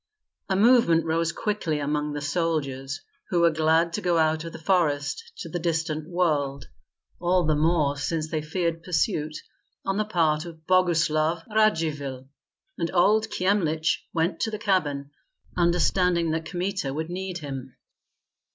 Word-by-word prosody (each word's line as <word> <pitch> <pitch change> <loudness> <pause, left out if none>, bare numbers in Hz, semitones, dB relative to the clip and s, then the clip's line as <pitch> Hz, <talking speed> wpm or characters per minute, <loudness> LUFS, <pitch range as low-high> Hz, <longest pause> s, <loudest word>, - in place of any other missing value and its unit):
A 190 - +2
movement 200 -7 +5
rose 165 +1 +1
quickly 195 -6 -2
among 150 +1 -1
the 145 - -4
soldiers, 145 -4 -2 0.3
who 175 -2 +2
were 170 0 +5
glad 160 +2 +2
to - - -2
go 175 -2 +2
out 160 0 +2
of 165 - -6
the - - -8
forest 165 - 0
to - - -6
the 175 +2 -4
distant 160 -2 -2
world, 150 -6 0 0.5
all 180 0 +2
the 155 - +2
more 150 -2 +2
since 155 +2 -2
they 155 -2 -1
feared 165 +1 -2
pursuit 155 -3 -1 0.5
on 195 0 0
the 215 - +1
part 160 -6 +1
of 160 -2 -11
Boguslav 165 -3 +2
Radzivill; 150 -11 +1 0.5
and 170 - 0
old 215 +5 +4
Kyemlich 180 -6 +1
went 165 +2 0
to 225 - 0
the 215 - -4
cabin, 150 -9 0 0.4
understanding 175 -1 +2
that 160 0 -2
Kmita 185 -5 -2
would 160 +2 -3
need 185 0 -4
him. 135 -5 -7
165 Hz, 150 wpm, -25 LUFS, 155-180 Hz, 0.5 s, movement